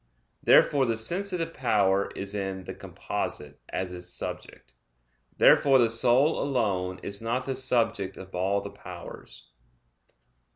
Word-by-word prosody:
Therefore 135 Hz, -3 st, +4 dB
the 115 Hz, -1 st, 0 dB
sensitive 170 Hz, -, -1 dB
power 100 Hz, -6 st, +1 dB
is 100 Hz, +1 st, -4 dB
in 95 Hz, -2 st, -4 dB
"the -, -, -7 dB
composite" 75 Hz, -1 st, -6 dB
as 95 Hz, -1 st, -3 dB
its 90 Hz, 0 st, -7 dB
subject. 65 Hz, -7 st, -7 dB, 0.6 s
Therefore 135 Hz, -2 st, +6 dB
the 115 Hz, -3 st, +3 dB
soul 125 Hz, +6 st, +3 dB
alone 100 Hz, -9 st, -1 dB
is 100 Hz, +1 st, -4 dB
not 120 Hz, +3 st, -2 dB
the 135 Hz, -, -2 dB
subject 115 Hz, -7 st, 0 dB
of 95 Hz, 0 st, -11 dB
all 95 Hz, +3 st, 0 dB
the -, -, -8 dB
powers. -, -, -11 dB
110 Hz, 130 wpm, -27 LUFS, 95-130 Hz, 0.6 s, Therefore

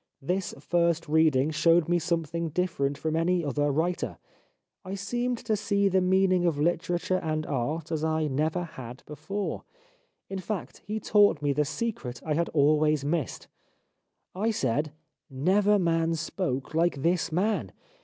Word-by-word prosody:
This 180 Hz, +7 st, -2 dB
first 170 Hz, +2 st, +1 dB
reading 155 Hz, -2 st, +3 dB
showed 165 Hz, +2 st, +3 dB
me 175 Hz, 0 st, +2 dB
something 170 Hz, 0 st, -2 dB
different 145 Hz, -5 st, -1 dB
from 160 Hz, 0 st, -2 dB
any 170 Hz, +1 st, +1 dB
other 145 Hz, +1 st, 0 dB
writer; 170 Hz, +5 st, -1 dB, 0.7 s
I 190 Hz, +1 st, -5 dB
seemed 240 Hz, +5 st, -2 dB
to 220 Hz, -, +2 dB
see 200 Hz, -1 st, +1 dB
the 190 Hz, 0 st, +3 dB
meaning 185 Hz, 0 st, +3 dB
of 170 Hz, -4 st, +1 dB
literature 175 Hz, +3 st, 0 dB
and 155 Hz, -1 st, -2 dB
art 150 Hz, +5 st, -2 dB
as 160 Hz, -1 st, -1 dB
I 160 Hz, 0 st, +1 dB
never 155 Hz, +5 st, 0 dB
had 130 Hz, -6 st, -9 dB
before; 155 Hz, +8 st, -4 dB, 0.6 s
in 195 Hz, -, -4 dB
fact 195 Hz, +1 st, -5 dB
he 215 Hz, +1 st, -2 dB
taught 205 Hz, -9 st, +3 dB
me 145 Hz, -1 st, +2 dB
the 150 Hz, +1 st, +1 dB
secret 145 Hz, -, -4 dB
I 155 Hz, -, 0 dB
had 170 Hz, +3 st, 0 dB
always 150 Hz, 0 st, +3 dB
missed. 155 Hz, -2 st, -2 dB, 0.9 s
I 210 Hz, +5 st, 0 dB
said: 145 Hz, -, 0 dB, 0.3 s
' -, -, -60 dB, 0.2 s
Never 205 Hz, +1 st, +4 dB
man 165 Hz, -2 st, +1 dB
spoke 160 Hz, -4 st, -3 dB
like 160 Hz, -4 st, +1 dB
this 170 Hz, -1 st, +1 dB
man.' 200 Hz, +7 st, 0 dB
165 Hz, 155 wpm, -27 LUFS, 150-185 Hz, 0.9 s, Never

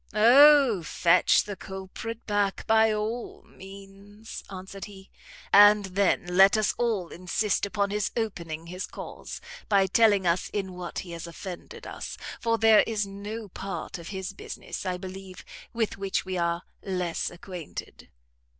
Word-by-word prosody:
"O, 260 Hz, -1 st, +7 dB
fetch 170 Hz, +2 st, +3 dB
the 205 Hz, 0 st, -6 dB
culprit 190 Hz, +5 st, -7 dB
back, 205 Hz, -2 st, 0 dB
by 220 Hz, 0 st, +4 dB
all 215 Hz, +3 st, -4 dB
means," 195 Hz, +2 st, -12 dB
answered 190 Hz, 0 st, -8 dB
he; 195 Hz, -2 st, -14 dB, 0.4 s
"and 205 Hz, 0 st, +8 dB
then 190 Hz, -1 st, +1 dB
let 190 Hz, +4 st, +5 dB
us 215 Hz, -1 st, +1 dB
all 220 Hz, -8 st, 0 dB
insist 190 Hz, +3 st, -1 dB
upon 200 Hz, 0 st, -1 dB
his 210 Hz, -1 st, 0 dB
opening 170 Hz, -8 st, -4 dB
his 180 Hz, +2 st, -6 dB
cause, -, -, -8 dB, 0.3 s
by 200 Hz, -2 st, +4 dB
telling 205 Hz, 0 st, +4 dB
us 170 Hz, +1 st, +1 dB
in 190 Hz, -3 st, -3 dB
what 180 Hz, -1 st, -7 dB
he 175 Hz, -, -9 dB
has 170 Hz, 0 st, -7 dB
offended 175 Hz, +1 st, -9 dB
us; -, -, -7 dB, 0.2 s
for 230 Hz, -1 st, +1 dB
there 220 Hz, -1 st, +6 dB
is 215 Hz, -2 st, -1 dB
no 205 Hz, +3 st, -7 dB
part 185 Hz, -2 st, -6 dB
of 170 Hz, -, -10 dB
his 190 Hz, -1 st, -5 dB
business, 195 Hz, -, -7 dB
I 180 Hz, -1 st, -1 dB
believe, 190 Hz, 0 st, -9 dB, 0.3 s
with 225 Hz, -4 st, -2 dB
which 195 Hz, -1 st, -1 dB
we 185 Hz, 0 st, -4 dB
are 170 Hz, 0 st, -1 dB, 0.2 s
less 180 Hz, -3 st, -2 dB
acquainted." 175 Hz, -2 st, -9 dB
195 Hz, 150 wpm, -27 LUFS, 185-210 Hz, 0.4 s, and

